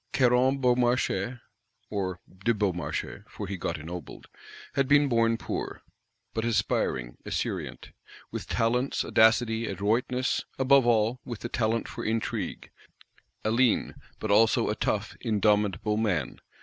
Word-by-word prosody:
Caron 130 +1 +4
Beaumarchais 125 -3 +1 0.5
(or 95 -3 -2 0.2
de 115 +1 +3
Beaumarchais, 95 -4 -2
for 105 - -6
he 100 +1 -4
got 85 -2 -3
ennobled) 85 0 -8 0.5
had 135 -1 +1
been 145 +1 +5
born 115 -2 +2
poor, - - -5 0.5
but 110 - -1
aspiring, 65 - 0
esurient; - - -4 0.4
with - - -5
talents, 125 +4 0
audacity, 110 0 +3
adroitness; 115 +6 0 0.2
above 135 -1 +5
all, 115 +1 +2
with 120 -4 -7
the 120 - -4
talent 115 0 0
for - - -6
intrigue: 110 0 -3 0.7
a 110 - +2
lean, 120 0 +2 0.2
but 110 - -3
also 110 +2 +4
a - - 0
tough, - - -1
indomitable 105 -1 +1
man. 90 - -1
115 Hz, 125 wpm, -28 LUFS, 105-125 Hz, 0.7 s, been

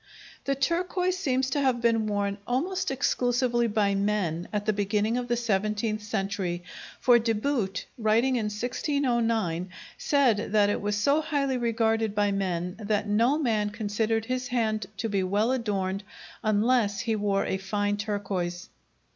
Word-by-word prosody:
The 275 - +1
turquoise 360 +5 0
seems 260 -5 0
to 285 - +1
have 260 -3 +2
been 230 -2 +2
worn 200 -1 -1
almost 355 +10 -1
exclusively 245 -2 +1
by 205 -2 +1
men 195 -4 -1
at 205 -1 -2
the 215 - +2
beginning 205 +2 0
of 245 0 -2
the 240 0 0
seventeenth 215 -1 0
century, 195 -4 -2 0.4
for 245 -1 +5
De 225 0 +1
Boot, 215 -4 -1
writing 230 +4 +3
in 230 -3 0
1609, 230 - 0 0.3
said 250 -9 +2
that 205 -1 +4
it - - -2
was 205 0 -1
so 280 +9 +2
highly 280 -4 0
regarded 225 -2 +1
by 205 0 +2
men 180 -2 -2
that 210 0 -1
no 230 +7 +3
man 220 -8 +1
considered 220 +1 -1
his 255 +1 -2
hand 220 -5 -1
to 230 - -2
be 200 -3 0
well 205 +6 +1
adorned 200 -6 -1 0.4
unless 215 -1 +2
he 225 -2 0
wore 200 -2 0
a 190 - -1
fine 205 +1 -1
turquoise. 195 -4 -3
215 Hz, 155 wpm, -27 LUFS, 205-245 Hz, 0.4 s, for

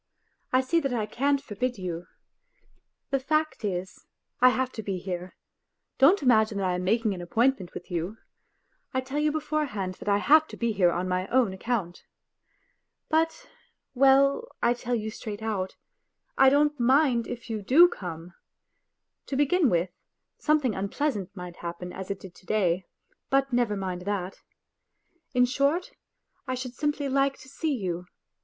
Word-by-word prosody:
I 255 - +4
see 300 +6 +2
that 275 -5 -1
I 220 -3 0
can't 280 +6 +1
forbid 250 -1 -3
you.... 175 -2 -5 1.0
The 275 - +2
fact 310 0 0
is, 185 -2 -4 0.3
I 255 - +7
have 255 0 0
to 220 - -6
be 195 -3 -3
here; 180 0 -5 0.6
don't 300 +6 +6
imagine 220 -4 +4
that 195 - -1
I 180 - +1
am 180 0 -2
making 220 +2 +1
an 180 - -6
appointment 225 +1 0
with 175 - -8
you; 175 +5 -3 0.8
I 260 - +2
tell 265 +3 -3
you 300 0 +2
beforehand 295 -11 -2
that - - -4
I 200 - +4
have 310 +8 +5
to - - -10
be 235 -1 0
here 190 -4 +3
on 180 +2 -2
my 185 +1 -1
own 245 -6 +2
account. 190 -3 -3 1.1
But.. 325 +9 0 0.5
well, 275 - +4
I 240 - +3
tell 245 0 -2
you 220 -1 -3
straight 215 -1 -6
10 220 +1 -6
WHITE 220 - +1
NIGHTS 185 -1 -3
out, - - -45 0.6
I 270 - +7
don't 295 +1 +2
mind 255 -1 +3
if 240 - -7
you 220 -2 -3
do 295 - +7
come. 175 - -7 0.9
To 275 - -3
begin 290 +2 +3
with, 175 0 +1 0.5
something 300 -6 +2
unpleasant 200 +1 -2
might 180 -2 -8
happen 175 +1 -6
as 190 -1 -7
it 200 -1 -3
did 185 -2 -11
to 185 - -20
day, 185 -4 +1 0.4
but 270 -1 +2
never 240 -4 +1
mind 185 -2 -3
that.. 195 -2 -3 0.9
In 250 0 +5
short, 280 +7 0 0.6
I 255 - -1
should 250 -1 -5
simply 295 0 -1
like 275 0 +1
to - - -15
see 295 +2 -2
you... 180 -5 -4
235 Hz, 170 wpm, -27 LUFS, 190-275 Hz, 1.1 s, I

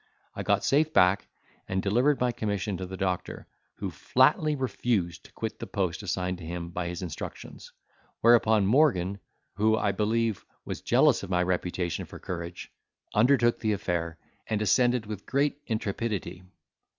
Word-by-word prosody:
I - - -5
got - - +1
safe 155 +3 +3
back, 90 +2 +4 0.4
and 95 - -1
delivered 125 +9 +2
my 125 -1 +2
commission 105 -3 -2
to 95 - -5
the 95 +1 -7
doctor, 90 -1 -3 0.3
who - - -4
flatly 155 -1 +3
refused 115 -9 -1
to - - -15
quit 110 -1 -5
the - - -6
post 95 -3 -2
assigned 90 -2 -2
to - - -10
him 85 +1 -5
by 90 0 -3
his 90 +1 -5
instructions; 85 -4 -8 0.5
whereupon 110 -3 +5
Morgan, 100 - +3 0.4
who 110 +1 +3
I 105 - +1
believe, 110 +1 0 0.2
was - - -5
jealous - - +4
of - - -7
my 90 -1 +2
reputation 90 -1 -2
for - - -11
courage, 85 -1 -6 0.4
undertook 120 +1 +4
the 110 -1 +1
affair, 85 -4 -2 0.3
and 110 - 0
ascended 120 +2 +3
with 105 -2 -7
great 140 +1 +1
intrepidity. 105 -4 -3
100 Hz, 155 wpm, -28 LUFS, 90-115 Hz, 0.5 s, whereupon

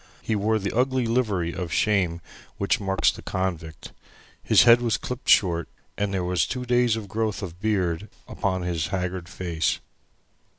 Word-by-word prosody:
He 110 - 0
wore 110 +2 +1
the 100 0 -3
ugly 130 0 +1
livery 105 -8 0
of 90 -3 -5
shame 90 -6 +1 0.4
which 100 - +1
marks 95 -2 +2
the - - -11
convict. 85 -4 -4 0.5
His - - +5
head 120 0 +7
was 115 -3 +1
clipped 125 +1 -6
short, 85 -4 +4 0.3
and 100 0 -1
there 95 -2 -1
was 90 0 +1
two 125 0 -4
days' 120 -2 +2
growth 110 0 -3
of 90 -2 -7
beard 100 -3 0 0.2
upon 95 -2 -2
his 85 -2 -1
haggard 90 -2 -3
face. 85 -4 -1
100 Hz, 160 wpm, -25 LUFS, 90-110 Hz, 0.5 s, head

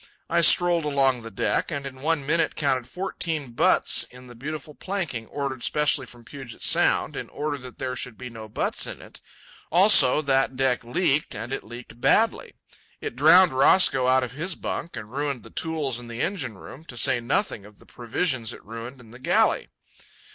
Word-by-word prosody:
I 170 0 +3
strolled 170 0 +5
along 135 -4 +2
the 115 - -8
deck - - -1
and 140 -4 -4
in 130 -1 -8
one 155 -2 0
minute 165 +3 +1
counted 135 -5 0
fourteen 160 -5 -4
butts 115 - +3
in 125 +1 -15
the 120 - -12
beautiful 150 +4 -7
planking 155 - -4
ordered 140 -3 -4
specially 150 -2 +1
from 120 -1 -14
Puget 130 -2 -10
Sound - - +3
in - - -6
order 145 -1 -4
that 125 -1 -11
there 130 -1 -3
should 125 -3 -6
be 125 - -7
no 110 -2 -10
butts - - -1
in - - -7
it. - - -14 0.5
Also, 160 -6 +6
that 135 -1 +1
deck 130 -2 +1
leaked, 145 +4 0
and 120 +4 -5
it - - -4
leaked 120 +1 -11
badly. - - +2 0.5
It - - -6
drowned 160 +5 +6
Roscoe 135 -1 +4
out 130 0 +4
of 125 - -5
his 165 +6 -3
bunk 170 - -5
and 105 +1 -8
ruined 140 -4 -3
the 115 - -14
tools 150 -7 -2
in 120 - -10
the 115 0 -7
engine 155 - -3
room, 135 +9 -12
to 125 - -10
say 120 +1 +3
nothing 120 - -1
of 105 0 -16
the - - -20
provisions 120 0 -2
it - - -14
ruined 115 +4 -8
in 115 -3 -16
the 120 - -13
galley. 130 - +2
135 Hz, 190 wpm, -25 LUFS, 120-155 Hz, 0.5 s, Also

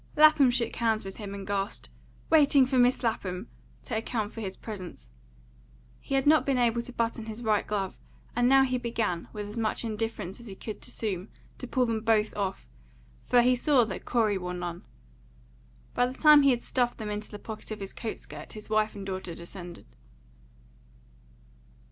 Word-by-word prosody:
Lapham 305 -3 +7
shook 240 -2 -1
hands 220 -3 +1
with 195 - -7
him 200 -2 -6
and 195 -1 -7
gasped, 195 - -3 0.4
"Waiting 285 -3 +6
for 260 0 +1
Mis' 245 +1 +4
Lapham," 200 -3 -2 0.3
to 235 - -4
account 220 -1 -2
for 225 - -6
his 195 -3 -5
presence. 180 - -8 0.9
He 275 - -3
had 270 - +2
not 310 +1 +6
been 275 -2 +1
able 235 -1 +2
to 245 - -7
button 230 -1 -2
his 220 +2 -6
right 215 -2 +1
glove, 195 -3 -2 0.4
and 245 +1 +3
he - - +4
now 265 -1 +5
began, 225 -8 -2
with 210 -1 -5
as 210 +3 -8
much 225 +1 -1
indifference 215 -3 -3
as 235 - -10
he 195 - -8
could 215 +2 -6
assume, 195 -3 -4 0.3
to 255 - -6
pull 250 +1 +2
them 225 -2 -1
both 220 -1 +2
off, 195 - -3 0.6
for 245 -1 +5
he 250 +1 +4
saw 260 0 +4
that - - -6
Corey 215 -5 +2
wore 180 0 -4
none. 175 -1 -5 1.1
By 245 - +2
the 255 - -6
time 300 -1 +8
he 280 - +5
had 245 -2 +1
stuffed 245 -2 0
them 215 -2 -4
into 210 +1 -5
the 210 - -7
pocket 220 +1 -8
of 215 - -5
his 195 -1 -6
coat 225 - -4
skirt - - -10
his 215 0 -10
wife 215 0 +2
and 200 -1 -7
daughter 185 -3 -5
descended. 175 0 -10
220 Hz, 190 wpm, -28 LUFS, 200-245 Hz, 1.1 s, time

